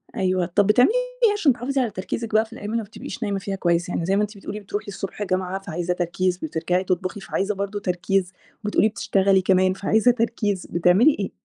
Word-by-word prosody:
أيوه 185 -1 +1
طَب 195 +3 +2
بتعملي 245 - +5 0.3
إيه 435 -3 +6
عشان 325 -10 +3
تحافظي 260 +3 -1
على 235 -4 -1
تركيزِك 215 +4 -5
بقى 220 +1 +4
في 225 - -15
الجامعة 215 -2 -6
وما 230 - 0
بتبقيش 205 +2 -8
نايمة 200 -2 -1
فيها 195 0 -4
كويس، 175 -2 0
يعني 170 - -2
زي 190 +2 +1
ما 205 - +2
أنتِ 210 0 -3
بتقولي 200 +1 -6
بتروحي 205 +1 -5
الصبح 195 0 -6
الجامعة 185 -1 -1
فعايزة 175 -2 -3
تركيز 180 +1 -1
بترجعي 175 +2 -1
تطبخي 185 +1 -2
فعايزة 195 +2 -2
برضه 200 +1 -3
تركيز، 185 0 -1 0.3
وبتقولي 210 +1 +3
بتشتغلي 195 -2 +2
كمان 185 0 +3
فعايزة 220 +5 +3
تركيز، 225 -5 -1
بتعملي 180 - +4
إيه؟ 195 - -2
195 Hz, 200 wpm, -23 LUFS, 185-215 Hz, 0.3 s, إيه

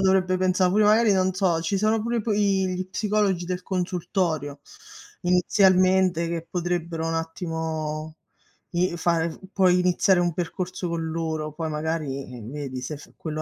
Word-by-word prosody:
dovrebbe 190 -1 +3
pensa' 185 0 +2
pure 205 +4 +3
magari 215 +1 +5
non 185 0 +2
so, 185 -3 +1
ci 190 +4 -1
sono 215 +1 +2
pure 235 0 0
p 210 - -12
i 195 -2 +2
gli 185 0 -2
psicologi 205 -3 0
del 180 +1 -3
consultorio 175 -5 -2 0.6
inizialmente, 185 -1 +3
che 165 -1 -3
potrebbero 170 -2 -2
un 165 - -1
attimo 160 -2 -4 0.6
i 175 0 +1
fare 170 -1 +1
f - - -13
puoi 180 -2 +4
iniziare 180 +1 +3
un 175 -1 +2
percorso 180 +1 -3
con 170 -1 -2
loro, 160 -2 -3
poi 160 -1 -3
magari, 150 -4 -3
ehm, 115 +2 -9
vedi 135 -3 -5
se 150 +4 -5
f 145 - -15
quello 155 -1 -4
175 Hz, 160 wpm, -25 LUFS, 160-185 Hz, 0.6 s, magari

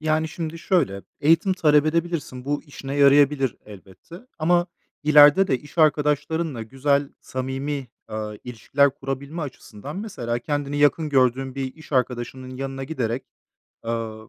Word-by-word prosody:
Yani 155 0 0
şimdi 165 0 -5
şöyle 140 - 0 0.2
eğitim 165 +6 +4
talep 150 -4 +3
edebilirsin. 160 -6 -2
Bu 145 +1 -2
işine 140 -2 -7
yarayabilir 140 -2 +4
elbette. 100 - -13 0.2
Ama 175 +2 +2 0.4
ileride 150 +5 +7
de 130 -3 +1
iş 145 +3 -15
arkadaşlarınla 150 -2 +1
güzel, 140 +4 0
samimi, 135 +1 -4 0.2
ııı, 105 -1 -5
ilişkiler 130 +4 +1
kurabilme 140 +4 -5
açısından 135 - -8
mesela 120 - -3
kendini 145 +2 -3
yakın 150 +2 +3
gördüğün 130 -1 +2
bir 135 -1 -4
iş 155 -1 -15
arkadaşının 130 0 -2
yanına 135 0 -4
giderek, 130 -4 -3 0.6
ııı, 110 -1 -4
140 Hz, 130 wpm, -23 LUFS, 130-155 Hz, 0.6 s, ileride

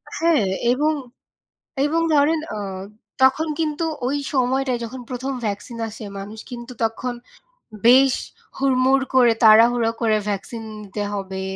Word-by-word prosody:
হ্যাঁ, 325 -9 +2 0.3
এবং, 300 +4 +1 0.9
এবং 325 +3 +1
ধরেন 300 +2 +3 0.2
আ - - -4 0.6
তখন 285 +5 +4
কিন্তু 310 0 -1 0.2
ওই 280 - 0 0.2
সময়টায় 260 0 +1
যখন 250 +3 -7
প্রথম 255 +2 -3
ভ্যাকসিন 210 +3 -5
আসে 220 0 -9
মানুষ 205 +3 -8
কিন্তু 240 0 -8
তখন 235 +2 -2 0.7
বেশ 260 +2 +6 0.4
হুড়মুড় 265 0 +3
করে 245 -3 +6
তাড়াহুড়ো 225 +1 +6
করে 220 -2 +2
ভ্যাকসিন 210 +3 -4 0.2
নিতে 205 0 -5
হবে 190 -1 -4
250 Hz, 125 wpm, -22 LUFS, 225-270 Hz, 0.9 s, বেশ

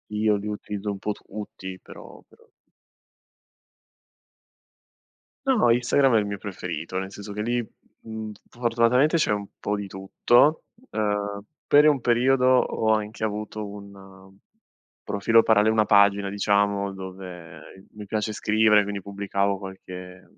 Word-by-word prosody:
Io 105 0 +2
li 105 +1 -6
utilizzo 105 0 -5
un 100 - -6
po' 105 - -2
tutti 95 -3 -8
però - - -13
però 465 0 -23 3.0
No, 240 - +3
Instagram 125 +1 +3
è - - +5
il 105 - -1
mio 100 -1 -4
preferito, 90 -3 -6
nel 95 0 -5
senso 105 +1 -9
che 105 +1 -4
lì, 120 +1 -1 0.4
mhmm, 110 -1 -7 0.2
fortunatamente 120 +5 +2
c'è 150 - +1
un 100 -1 -2
po' 105 - -1
di 100 -1 -5
tutto. 120 - +2 0.3
Uhm, 105 -1 -2 0.3
per 150 +1 +6
un 140 -5 +3
periodo 125 +2 +3
ho 125 -3 +2
anche 110 0 -3
avuto 105 0 -3
un 95 -1 -12 0.7
profilo 115 +3 +3
paralle 110 -1 +4
una 110 -1 +3
pagina 100 -1 +4
diciamo, 100 0 +1
dove 90 -2 -10
mi 105 -1 -10
piace 105 +1 -2
scrivere 105 0 +3
quindi 100 -1 -5
pubblicavo 100 0 -1
qualche, 90 -1 -10
mhmm, - - -29
105 Hz, 135 wpm, -25 LUFS, 100-110 Hz, 3.0 s, per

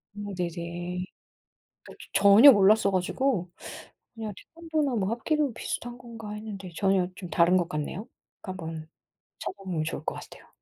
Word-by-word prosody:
음, 205 -1 -6
네네. 175 +1 -4 0.8
그러니까 - - -13 0.2
저 - - +2
전혀 215 +8 +10
몰랐어 205 -1 +5
가지고 185 +1 0 0.7
그냥 220 -2 -5
태권도나 315 -5 -2
뭐 200 -3 0
합기도 280 +4 0
비슷한 240 +1 -5
건가 230 -3 -9
했는데 210 -4 -7
전혀 190 -1 +2
좀 185 -3 -8
다른 170 +2 +4
것 175 -2 0
같네요. 165 +7 -4 0.3
그러니까 185 -4 -6
뭐 160 0 -5 0.6
찾아보면 185 -5 -4
좋을 155 - -5
것 - - -2
같아요. - - -12
200 Hz, 330 characters per minute, -27 LUFS, 180-230 Hz, 0.8 s, 전혀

